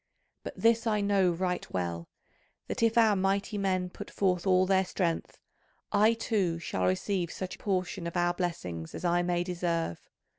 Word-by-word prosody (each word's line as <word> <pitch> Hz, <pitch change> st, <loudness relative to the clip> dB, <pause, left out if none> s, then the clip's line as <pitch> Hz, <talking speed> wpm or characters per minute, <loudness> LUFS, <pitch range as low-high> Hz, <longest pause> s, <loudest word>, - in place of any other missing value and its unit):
But -, -, -7 dB
this 230 Hz, 0 st, +3 dB
I 215 Hz, -1 st, +2 dB
know 200 Hz, -2 st, +3 dB
right 180 Hz, +1 st, -2 dB
well, 85 Hz, -2 st, -3 dB, 0.6 s
that -, -, -4 dB
if 230 Hz, 0 st, +3 dB
our 220 Hz, -3 st, +5 dB
mighty 195 Hz, +2 st, 0 dB
men 185 Hz, -2 st, 0 dB
put -, -, -8 dB
forth 185 Hz, -2 st, 0 dB
all 185 Hz, 0 st, +5 dB
their 190 Hz, 0 st, +3 dB
strength, 180 Hz, -2 st, -2 dB, 0.5 s
I 215 Hz, +3 st, +4 dB
too 200 Hz, -7 st, 0 dB
shall 95 Hz, -, -1 dB
receive 170 Hz, -, 0 dB
such 185 Hz, -1 st, -6 dB
portion 185 Hz, -3 st, -2 dB
of 170 Hz, -, -4 dB
our 175 Hz, 0 st, +2 dB
blessings 90 Hz, -, -4 dB
as -, -, -5 dB
I 175 Hz, 0 st, +3 dB
may 175 Hz, 0 st, 0 dB
deserve. 170 Hz, -, -2 dB
180 Hz, 165 wpm, -29 LUFS, 170-200 Hz, 0.6 s, our